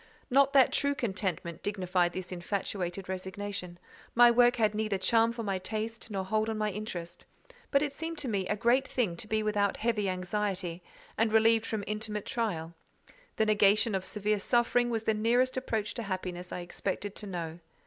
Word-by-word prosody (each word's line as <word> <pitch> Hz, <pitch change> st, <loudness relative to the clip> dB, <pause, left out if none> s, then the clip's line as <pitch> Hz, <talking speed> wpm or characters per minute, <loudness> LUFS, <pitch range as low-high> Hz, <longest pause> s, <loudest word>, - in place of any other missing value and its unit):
Not 275 Hz, +1 st, +5 dB
that 270 Hz, -2 st, +6 dB
true 285 Hz, 0 st, +1 dB
contentment 185 Hz, -, -3 dB
dignified 185 Hz, -3 st, 0 dB
this 185 Hz, -1 st, -5 dB
infatuated 185 Hz, 0 st, -3 dB
resignation: 190 Hz, -1 st, -5 dB, 0.4 s
my 240 Hz, 0 st, +8 dB
work 245 Hz, +1 st, +5 dB
had 215 Hz, -3 st, +2 dB
neither 215 Hz, -2 st, -1 dB
charm 225 Hz, +4 st, +3 dB
for 235 Hz, -1 st, -5 dB
my 195 Hz, -3 st, -1 dB
taste, 220 Hz, +4 st, -4 dB
nor 195 Hz, -3 st, -3 dB
hold 215 Hz, +3 st, 0 dB
on 220 Hz, -, -2 dB
my 215 Hz, -1 st, 0 dB
interest; 180 Hz, -4 st, -6 dB, 0.5 s
but 280 Hz, 0 st, +3 dB
it 290 Hz, -2 st, -2 dB
seemed 325 Hz, +2 st, -5 dB
to 275 Hz, -, -1 dB
me 195 Hz, -5 st, -1 dB
a 210 Hz, -, 0 dB
great 245 Hz, +4 st, +2 dB
thing 220 Hz, -11 st, 0 dB
to 210 Hz, -, -5 dB
be 215 Hz, 0 st, 0 dB
without 205 Hz, -2 st, +1 dB
heavy 215 Hz, -3 st, 0 dB
anxiety, 185 Hz, -1 st, -2 dB, 0.4 s
and 225 Hz, -1 st, +3 dB
relieved 225 Hz, 0 st, +4 dB
from 215 Hz, -2 st, -2 dB
intimate 210 Hz, -1 st, -3 dB
trial: 170 Hz, -9 st, -2 dB, 0.6 s
the 220 Hz, -, +2 dB
negation 210 Hz, +1 st, +4 dB
of 190 Hz, -1 st, -1 dB
severe 210 Hz, +1 st, -1 dB
suffering 240 Hz, +2 st, +2 dB
was 225 Hz, -2 st, -1 dB
the 220 Hz, -, +2 dB
nearest 240 Hz, +4 st, +2 dB
approach 225 Hz, -5 st, -2 dB
to 235 Hz, -, -4 dB
happiness 185 Hz, -3 st, -4 dB
I 180 Hz, -, -4 dB
expected 195 Hz, +3 st, -4 dB
to 210 Hz, -, -4 dB
know. 170 Hz, -3 st, -5 dB
210 Hz, 180 wpm, -30 LUFS, 185-230 Hz, 0.6 s, my